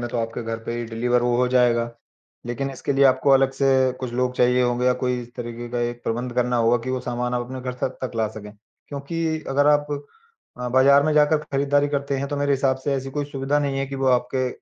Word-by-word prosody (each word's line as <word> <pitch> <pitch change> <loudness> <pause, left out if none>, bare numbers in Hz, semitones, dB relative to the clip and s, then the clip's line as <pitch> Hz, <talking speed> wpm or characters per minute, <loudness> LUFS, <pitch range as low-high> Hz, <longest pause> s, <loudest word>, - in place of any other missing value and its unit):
में 120 - -3
तो 120 - -2
आपके 115 +1 -3
घर 115 0 -4
पे 115 - -3
ही 120 - -3
डिलिवर 120 +2 0
वो 120 0 +1
हो 125 +1 +2
जाएगा। 120 -2 +2 0.6
लेकिन 135 +3 -3
इसके 135 +1 -3
लिए 140 0 +3
आपको 130 +1 +4
अलग 135 0 +5
से 135 +1 0 0.3
कुछ 125 -2 -4
लोग 125 +1 0
चाहिए 125 0 +3
होंगे 120 0 +1
या 125 - +5
कोई 125 -1 0
इस 120 0 -15
तरीके 120 0 -6
का 120 0 -2
एक 120 0 -3
प्रबंध 120 +2 -2
करना 125 0 +1
होगा 115 +1 +3
कि 130 - -3
वो 130 0 -1
सामान 125 0 -3
आप 120 0 -2
अपने 130 +1 -7
घर 125 0 -4
तक 130 - -2
तक 130 - -4
ला 110 -1 +1
सकें, 105 -1 -10 0.4
क्योंकि 160 +3 -3
अगर 145 +2 +2
आप 145 0 +4 0.7
अ, 125 0 -3
बाजार 135 +3 +5
में 155 +1 +1
जाकर 150 +1 +4
खरीदारी 145 +1 +2
करते 140 -1 -2
हैं 140 - -2
तो 145 - -3
मेरे 145 0 +1
हिसाब 135 -1 +1
से 140 - 0
ऐसी 135 0 -4
कोई 145 +1 -2
सुविधा 140 +1 -1
नहीं 140 -2 -1
है 135 - -1
कि 135 - -7
वो - - +2
आपके 125 +1 +1
125 Hz, 250 wpm, -23 LUFS, 120-140 Hz, 0.7 s, अलग